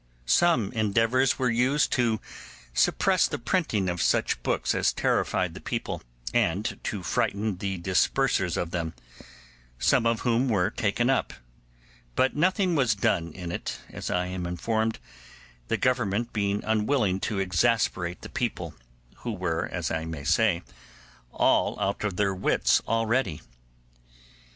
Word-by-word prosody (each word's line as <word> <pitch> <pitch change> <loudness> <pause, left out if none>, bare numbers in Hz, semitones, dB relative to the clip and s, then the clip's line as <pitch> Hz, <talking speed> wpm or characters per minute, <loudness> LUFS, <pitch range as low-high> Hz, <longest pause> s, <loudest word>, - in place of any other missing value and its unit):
Some 110 - +3
endeavours 115 +4 +2
were 125 -2 +1
used 130 +5 +2
to 115 -4 +1 0.5
suppress - - +3
the - - -3
printing 120 - 0
of 90 -1 -1
such - - +1
books - - 0
as - - +2
terrified - - 0
the - - -10
people, - - -3 0.3
and 95 +7 0
to 100 -4 -3
frighten 100 +4 -1
the 95 0 -3
dispersers 95 +2 +1
of 85 - -2
them, 85 -4 -3 0.8
some 115 - +3
of 115 -1 +1
whom 120 +2 +1
were 100 -3 +2
taken 115 +2 0
up; 135 - 0 0.8
but 130 - +2
nothing 185 +3 +2
was 125 -9 +2
done 85 -4 0
in 90 -2 -6
it, - - -4
as - - -5
I 90 0 0
am 90 -1 -4
informed, 110 +6 -1 0.7
the - - 0
Government 120 -3 0
being 100 -1 0
unwilling 105 -3 +1
to 105 +1 -2
exasperate 90 -2 +1
the - - -8
people, - - -3 0.4
who 120 - -5
were, 90 -4 -2
as 85 -3 -2
I 80 0 -2
may 80 -3 -6
say, 90 +1 +2 0.7
all - - +2
out 100 +2 -1
of 105 -3 -1
their 100 0 +1
wits 95 +1 +2
already. 115 - 0
105 Hz, 140 wpm, -27 LUFS, 90-120 Hz, 0.8 s, Some